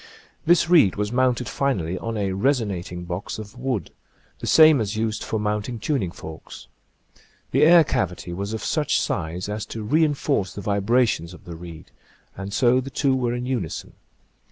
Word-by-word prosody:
This 170 -1 +5
reed 160 - +5
was 105 +1 -2
mounted 125 -1 +1
finally 100 -10 -1
on 115 -1 -4
a 100 -2 -1
resonat 100 -5 0
ing 90 0 -6
box 90 +2 -5
of 110 +2 -9
wood, 125 - -3 0.5
the - - -5
same 155 -5 +7
as 105 0 -3
used 110 -1 -1
for 110 - -2
mount 105 +1 -1
ing 120 - -4
tuning 110 - -1
forks. 80 -1 -10 0.9
The 135 - +2
air 165 +2 +8
cavity 90 - -2
was 100 +3 -4
of 110 - -4
such 150 -2 +1
size 85 +2 -2
as 105 0 -3
to 110 - -6
re 150 +10 +3
enforce 140 - 0
the 100 - -5
vibrations 100 -3 +1
of - - -18
the 85 - -7
reed, 85 -1 -11 0.4
and 95 +1 -6
so 125 +4 +3
the 135 - -7
two 135 0 +1
were 120 -2 0
in 125 0 -4
unison. 125 - -4
110 Hz, 180 wpm, -23 LUFS, 95-130 Hz, 0.9 s, air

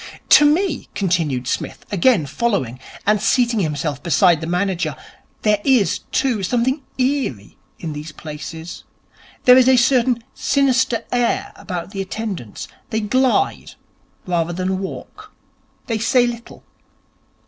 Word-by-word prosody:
'To 300 - +8
me,' 335 -3 -1
continued 165 -9 0
Psmith, - - -4
again 200 - +3
following, 140 - -1 0.3
and 210 0 +2
seating 235 0 +2
himself 150 -4 -2
beside 170 -2 +3
the 160 - -4
manager, 180 +1 -1 0.5
'there 210 -1 +2
is, 255 -7 +3
too, 245 -6 +1
something 245 +8 0 0.2
eerie 255 - -1 0.2
in 160 -3 -5
these 150 +2 -7
places. 155 +2 -8 0.6
There 250 +1 +8
is 260 0 +5
a 260 - +5
certain 245 -1 +2
sinister 255 -4 +1
air 245 -1 0
about 180 -1 -6
the 195 -2 -4
attendants. 190 - -5 0.2
They 220 0 -1
glide 260 - +1 0.5
rather 175 -1 -1
than 185 +1 -2
walk. 425 - -8 0.5
They 225 -3 -2
say 245 +2 +3
little. 235 -1 -7
210 Hz, 125 wpm, -20 LUFS, 170-250 Hz, 0.6 s, To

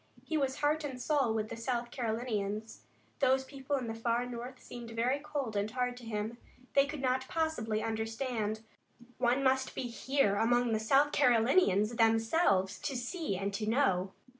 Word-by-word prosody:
He 320 - -3
was 275 -1 0
heart 300 +1 +2
and 265 -4 -5
soul 275 -3 +1
with 215 -1 -1
the - - -5
South 235 0 -2
Carolinians. 220 -3 -3 0.4
Those 265 0 +3
people 275 +1 -4
in 260 -3 -2
the 225 - -3
far 235 +2 0
north 245 +1 -7
seemed 240 -1 -9
very 240 +5 0
cold 285 -6 -4
and 205 +1 0
hard 250 +1 -1
to 250 - -11
him. 220 +1 -3 0.3
They 280 0 +5
could 295 -1 -5
not 260 0 +1
possibly 240 -10 -1
understand. 225 -1 -2 0.6
One 250 +2 +2
must 265 0 +1
be - - -2
here 245 -3 +1
among 240 +1 +2
the 220 - +1
South 275 +7 +3
Carolinians 235 - +3
themselves 225 - +3
to 270 - -3
see 245 - -3
and 200 +1 -2
to 215 +1 -2
know. 195 -7 +2
240 Hz, 170 wpm, -32 LUFS, 220-270 Hz, 0.6 s, They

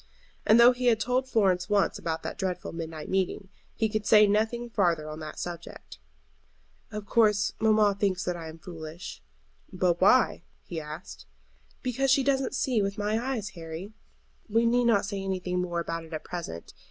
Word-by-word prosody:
And 220 +2 +7
though 240 +1 +9
he 250 0 -2
had 225 -3 +4
told 255 +3 0
Florence 190 -5 +2
once 205 -1 +2
about 160 -1 -3
that - - -5
dreadful 180 -2 -3
midnight 160 -2 -6
meeting, 190 0 -1 0.3
he 220 - +1
could 215 -1 -3
say 210 -1 +7
nothing 220 +4 0
farther 175 -9 +1
on 155 0 -7
that 155 -1 -7
subject. 175 -2 -8 0.9
"Of 210 -1 -6
course 210 -2 +3
mamma 215 -2 +4
thinks 190 -2 +1
that 180 - -2
I 165 -2 -7
am 160 - -10
foolish." 165 - -8 0.5
"But 180 -1 +1
why?" 220 +3 +4 0.2
he 165 -2 -5
asked. 65 - -9 0.6
"Because 260 +2 0
she 270 +1 +4
doesn't 270 0 +1
see 250 -4 +1
with 200 0 -2
my 210 +2 0
eyes, 245 -6 -2
Harry. 170 +2 -8 0.6
We 230 +2 +3
need 240 +1 +3
not 225 -5 +3
say 200 -1 -4
anything 185 -2 -2
more 175 -1 -2
about 165 0 -3
it 160 0 -12
at 155 - -4
present. 170 - -7
195 Hz, 175 wpm, -28 LUFS, 170-225 Hz, 0.9 s, though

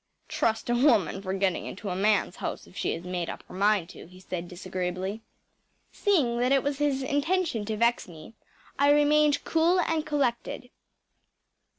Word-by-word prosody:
“Trust 220 0 -1
a 240 - +1
woman 230 - +3
for 190 -1 -4
getting 195 -2 0
into 205 +1 -6
a - - -2
man’s 200 -1 +1
house - - -5
if - - -19
she - - -1
has 165 - -6
made 180 -1 -3
up - - -7
her - - -15
mind 200 -2 +2
to,‚ÄĚ 170 - -12
he 185 0 -15
said 180 -2 -5
disagreeably. 185 +3 -4 0.7
Seeing 280 -13 +1
that 250 +2 +1
it 275 -1 +3
was 285 0 -2
his 280 -2 +1
intention 290 - 0
to 215 0 -3
vex 235 +2 +1
me 170 +5 -12 0.5
I 285 +1 +5
remained 295 0 +4
cool 335 +3 +2
and 325 -3 0
collected. 260 -4 -2
230 Hz, 175 wpm, -27 LUFS, 185-290 Hz, 0.7 s, I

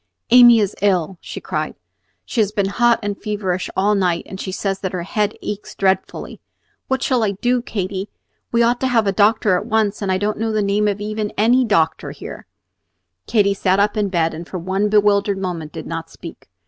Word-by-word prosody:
"Amy 240 -1 +8
is 205 -2 0
ill," 185 -3 +1
she - - -7
cried. - - -3 0.5
"She 235 - 0
has 205 -1 +1
been 200 -2 0
hot 240 +3 +3
and 205 -1 -2
feverish 195 -4 -2
all 200 +2 +3
night, 180 -4 +1
and 190 - -8
she 190 - -4
says 195 0 -2
that 190 -1 -4
her 180 -2 -3
head 210 +3 -1
aches 210 0 -6
dreadfully. 190 -1 -1 0.5
What 265 -1 -1
shall 255 -3 +1
I 205 -2 +1
do, 245 +5 0
Katy? 195 -3 -4 0.4
We 235 0 +3
ought 240 +1 +2
to 260 - 0
have 230 -4 +2
a 195 - +2
doctor 210 0 +3
at - - -5
once, 215 -1 0
and 195 -2 -1
I 185 - +2
don't 205 +2 -2
know 225 0 -1
the 215 -1 0
name 205 +1 +1
even 210 +1 -3
of - - -13
any 245 +4 +4
doctor 180 -8 +1
here." - - -9 0.8
Katy 205 -3 +3
sat 190 0 +1
up 205 +2 +2
in 210 -2 0
bed, 165 -3 0
and 165 +2 -8
for 185 - -5
one 190 +4 -1
bewildered 205 -1 +3
moment 175 -5 -4
did - - -7
not 165 0 -5
speak. - - -12
205 Hz, 210 wpm, -20 LUFS, 190-215 Hz, 0.8 s, Amy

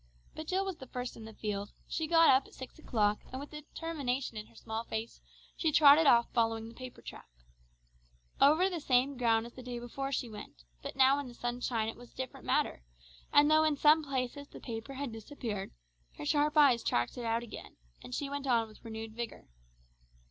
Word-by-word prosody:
But 315 - -7
Jill 380 +2 0
was 380 -3 -4
the 260 - -10
first 250 0 -5
in 220 - -10
the 220 - -10
field. 205 -1 -4
She 320 - -2
got 330 -1 +6
up 265 +1 +4
at - - -17
six 260 +4 -10
o'clock, 210 -8 +1
and 260 - -5
with 285 - -8
determination 295 -5 -4
in 215 0 -6
her - - -23
small 220 0 -4
face, 225 0 -5 0.3
she 320 - +1
trotted 295 +1 +7
off 235 -2 +6
following 225 -1 +1
the 230 - -11
paper 255 +1 -10
track. - - -10 1.1
Over 310 +7 +6
the 360 -3 -3
same 270 -1 +2
ground 230 -2 +2
as 240 - -10
the 255 - -10
day 250 -1 -5
before 270 +3 -4
she 255 - -1
went, 210 - -10 0.2
but - - -6
now 270 +1 +5
in 285 - -5
the 240 - -11
sunshine 240 -2 -2
it 225 - -5
was 245 0 -14
a - - -29
different 260 -1 -6
matter, - - +1 0.5
and 295 +1 +6
though 310 0 +6
in 310 -2 +2
some 305 +2 +5
places 275 0 -3
the - - -12
paper 230 +3 -6
had 275 -2 -4
disappeared, 220 -3 -5 0.5
her - - -6
sharp 300 - +2
eyes 270 -6 +6
tracked 120 0 0
it 245 - -5
out 230 +1 0
again, 235 - -10 0.2
and 250 - -6
she 285 - -2
went 280 0 -4
on 230 -3 +3
with 215 - -17
renewed 220 -1 -7
vigour. 235 - -6
250 Hz, 210 wpm, -32 LUFS, 225-285 Hz, 1.1 s, trotted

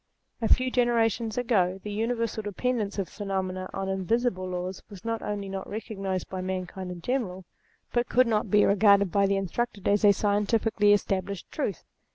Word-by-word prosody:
A 225 - +1
few 255 0 +4
generations 230 -2 +1
ago 195 -7 +1
the 210 - -5
universal 225 +1 -1
dependence 210 0 -2
of 195 -3 -1
phenomena 190 -2 -3
on 195 0 -3
invariable 190 0 0
laws 180 +1 -4
was 200 0 -12
not 230 0 -2
only 205 -1 -3
not 195 0 -5
recog 215 0 -6
nized 190 -2 -2
by 185 -1 -5
mankind 185 0 -4
in 180 -1 -7
general 190 -5 -2 0.5
but 240 0 +1
could 255 +1 +5
not 215 -3 0
be 205 +2 +5
regarded 200 -1 +5
by 200 -1 +3
the 195 0 +1
instructed 200 +2 -2
as 205 +1 +3
a 205 - +8
scientifically 205 +1 +2
established 195 -2 0
truth. 210 - -3
205 Hz, 175 wpm, -27 LUFS, 190-225 Hz, 0.5 s, a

